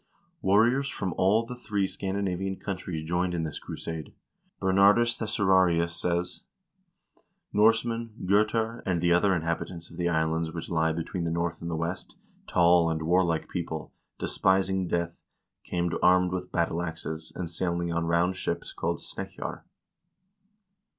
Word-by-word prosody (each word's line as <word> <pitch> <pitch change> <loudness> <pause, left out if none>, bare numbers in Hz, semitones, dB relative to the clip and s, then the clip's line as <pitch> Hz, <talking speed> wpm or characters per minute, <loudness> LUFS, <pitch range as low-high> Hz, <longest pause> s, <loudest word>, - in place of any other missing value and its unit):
Warriors 120 +8 +3
from 95 -9 -3
all 105 +5 +3
the 125 - -6
three 105 -5 -1
Scandinavian 95 -1 -2
countries 90 -5 -4
joined 90 +2 0
in 80 - -1
this 80 -2 -4
crusade; 80 -1 -6 0.4
Ber 95 0 +1
nardus 105 +5 +5
Thesaurarius 95 -6 +2
says: 85 +1 -2 0.5
" - - -42
Norsemen, 115 +2 +3
Gotar, 110 +4 +2
and 90 -3 0
the 85 +1 +3
other 90 0 +3
inhab 85 +1 -1
itants 85 -2 -7
of - - -12
the 85 0 +1
islands 80 0 0
which 85 0 -6
lie 80 -1 +2
between 85 +2 -3
the 85 - -1
North 85 0 -2
and 85 - -4
the 85 - -2
West, 85 +3 -4 0.3
tall 85 -1 +4
and 80 -1 -2
warlike 85 -1 +2
people, 80 -4 -5 0.2
despising 95 -1 +1
death, 85 0 -1 0.5
came 85 -1 -1
armed 90 0 +5
with 90 0 -4
battle 85 0 0
axes, 80 -2 -5
and 90 - -3
sailing 85 0 -1
on 85 0 0
round 85 +2 +2
ships 85 -2 -3
called - - -1
snekkjar." - - -6
90 Hz, 150 wpm, -28 LUFS, 85-95 Hz, 0.5 s, nardus